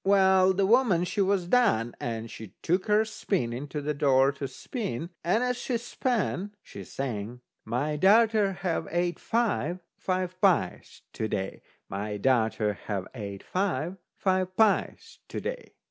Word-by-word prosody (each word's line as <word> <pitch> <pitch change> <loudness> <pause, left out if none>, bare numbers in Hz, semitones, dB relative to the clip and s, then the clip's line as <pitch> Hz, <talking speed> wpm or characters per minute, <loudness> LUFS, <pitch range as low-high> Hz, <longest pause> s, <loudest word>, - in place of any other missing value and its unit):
Well, 190 -1 +5
the 195 +1 +2
woman 215 -5 +4
she 200 +3 -1
was 190 -2 +1
done, 180 - +3
and 115 -1 -4
she 110 -4 -10
took 180 +3 +1
her 210 +1 +4
spinning 145 - -2
to 150 +1 -4
the 150 +1 0
door 135 -1 +4
to 140 0 -5
spin, 170 - -5
and 200 +8 +2
as 250 0 0
she 245 0 -1
span 220 -4 -2
she 100 - -9
sang: 120 0 -5 0.2
"My 145 +5 -1
darter 215 +2 +5
ha' 175 -3 -2
ate 175 +1 0
five, 210 - 0 0.2
five 185 0 -2
pies 195 -3 +1
to 110 - -2
day. 95 -2 -3 0.3
My 105 +1 -4
darter 110 -2 +2
ha' 100 -3 -1
ate 100 -5 -6
five, 180 -2 -1 0.2
five 185 -1 0
pies 215 -3 +1
to - - -4
day." - - -6
180 Hz, 150 wpm, -28 LUFS, 125-200 Hz, 0.3 s, Well